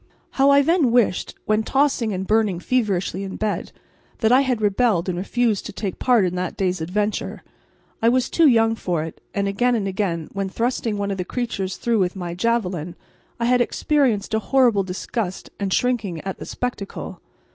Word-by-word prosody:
How 270 Hz, +1 st, +3 dB
I 280 Hz, 0 st, +6 dB
then 325 Hz, -3 st, +3 dB
wished, 230 Hz, -6 st, +1 dB
when 215 Hz, +1 st, +2 dB
tossing 265 Hz, -2 st, +1 dB
and 190 Hz, -1 st, -3 dB
burning 210 Hz, -4 st, +2 dB
feverishly 195 Hz, -4 st, 0 dB
in 195 Hz, -, -6 dB
bed, 215 Hz, -1 st, -2 dB, 0.5 s
that 220 Hz, 0 st, +3 dB
I 255 Hz, +2 st, +6 dB
had 255 Hz, -4 st, 0 dB
rebelled 205 Hz, -3 st, +2 dB
and 185 Hz, -, -1 dB
refused 215 Hz, +3 st, 0 dB
to -, -, -7 dB
take 195 Hz, -2 st, -4 dB
part 240 Hz, -6 st, +4 dB
in 180 Hz, -, -1 dB
that 180 Hz, 0 st, -3 dB
day's 185 Hz, -3 st, 0 dB
adventure! 205 Hz, +6 st, -2 dB, 0.6 s
I 230 Hz, -, +5 dB
was 255 Hz, +1 st, +2 dB
too 330 Hz, -2 st, +4 dB
young 225 Hz, -3 st, +4 dB
for 175 Hz, -7 st, -2 dB
it, 160 Hz, -, -8 dB
and 200 Hz, -1 st, 0 dB
again 240 Hz, +5 st, +1 dB
and 205 Hz, -4 st, -1 dB
again, 185 Hz, -5 st, -2 dB
when 195 Hz, -1 st, -2 dB
thrusting 230 Hz, 0 st, -1 dB
one 200 Hz, 0 st, -2 dB
of 195 Hz, -, -3 dB
the 180 Hz, -, -2 dB
creatures 195 Hz, -3 st, -3 dB
through 235 Hz, -2 st, +1 dB
with 180 Hz, -1 st, 0 dB
my 175 Hz, -2 st, -4 dB
javeline, 180 Hz, -5 st, -1 dB, 0.4 s
I 235 Hz, -, 0 dB
had 250 Hz, +1 st, +3 dB
experienced 240 Hz, -6 st, +1 dB
a 220 Hz, -, +3 dB
horrible 240 Hz, -3 st, +3 dB
disgust 190 Hz, +1 st, -4 dB
and 200 Hz, -2 st, -2 dB
shrinking 210 Hz, -9 st, 0 dB
at 190 Hz, -1 st, -5 dB
the -, -, -7 dB
spectacle. 245 Hz, -5 st, -5 dB
210 Hz, 190 wpm, -22 LUFS, 190-245 Hz, 0.6 s, I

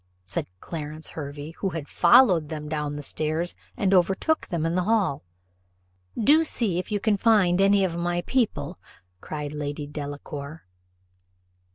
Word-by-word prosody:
said 90 Hz, -, -2 dB
Clarence 155 Hz, -1 st, -6 dB
Hervey, 145 Hz, 0 st, -7 dB
who 195 Hz, -, 0 dB
had 160 Hz, -4 st, -5 dB
followed 175 Hz, -, +5 dB
them 150 Hz, -1 st, -5 dB
down 150 Hz, -1 st, -3 dB
stairs, 155 Hz, +4 st, -1 dB, 0.2 s
and 195 Hz, -1 st, +2 dB
overtook 195 Hz, -, +2 dB
them 170 Hz, -3 st, -2 dB
in 165 Hz, -, 0 dB
the 180 Hz, 0 st, 0 dB
hall. 205 Hz, -9 st, +1 dB, 1.0 s
"Do 295 Hz, +8 st, +5 dB
see 220 Hz, -, 0 dB
if 185 Hz, -, -6 dB
you 205 Hz, -, +1 dB
can 210 Hz, 0 st, +1 dB
find 195 Hz, -4 st, +4 dB
any 200 Hz, 0 st, +4 dB
of 175 Hz, -3 st, -1 dB
my 175 Hz, 0 st, -1 dB
people," 250 Hz, 0 st, -1 dB, 0.4 s
cried 150 Hz, -1 st, -5 dB
Lady 145 Hz, 0 st, -4 dB
Delacour. 145 Hz, 0 st, -7 dB
170 Hz, 145 wpm, -25 LUFS, 150-195 Hz, 1.0 s, followed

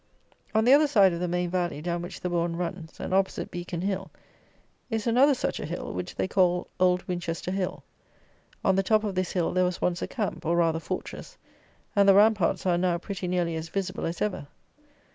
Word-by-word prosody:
On 220 Hz, +1 st, +4 dB
the 255 Hz, -, +7 dB
other 300 Hz, +2 st, +6 dB
side 200 Hz, -9 st, +5 dB
of 170 Hz, -, -3 dB
the 180 Hz, -, -1 dB
main 175 Hz, 0 st, -1 dB
valley 175 Hz, -4 st, -1 dB
down 170 Hz, +2 st, -2 dB
which 175 Hz, -, -8 dB
the 180 Hz, -, -2 dB
bourn 170 Hz, -1 st, 0 dB
runs, 170 Hz, -1 st, -5 dB
and -, -, -4 dB
opposite 190 Hz, 0 st, 0 dB
Beacon 175 Hz, -1 st, -5 dB
Hill, 190 Hz, 0 st, -2 dB, 0.8 s
is 225 Hz, -3 st, -2 dB
another 260 Hz, +4 st, +5 dB
such -, -, -2 dB
a -, -, -4 dB
hill, -, -, -5 dB
which -, -, -5 dB
they -, -, -1 dB
call 180 Hz, -2 st, +2 dB
Old 180 Hz, 0 st, +2 dB
Winchester 175 Hz, 0 st, -3 dB
Hill. 190 Hz, -1 st, -3 dB, 0.8 s
On 190 Hz, -, +4 dB
the 195 Hz, -, +3 dB
top 215 Hz, +3 st, +2 dB
of 205 Hz, -2 st, -2 dB
this 185 Hz, -1 st, -2 dB
hill 175 Hz, -3 st, 0 dB
there 185 Hz, 0 st, +3 dB
was 180 Hz, -1 st, -1 dB
once 180 Hz, 0 st, 0 dB
a -, -, -2 dB
camp, 205 Hz, -7 st, -3 dB
or, 170 Hz, +1 st, +1 dB
rather 165 Hz, -1 st, +2 dB
fortress; -, -, -6 dB, 0.6 s
and 200 Hz, -1 st, +5 dB
the 195 Hz, -, +7 dB
ramparts 205 Hz, -4 st, +3 dB
are 175 Hz, -2 st, +2 dB
now 175 Hz, -1 st, +1 dB
pretty 185 Hz, +1 st, -5 dB
nearly 175 Hz, -2 st, 0 dB
as 160 Hz, +1 st, -5 dB
visible 195 Hz, -2 st, -3 dB
as 170 Hz, -, -2 dB
ever. 205 Hz, -8 st, -3 dB
180 Hz, 210 wpm, -27 LUFS, 175-195 Hz, 0.8 s, the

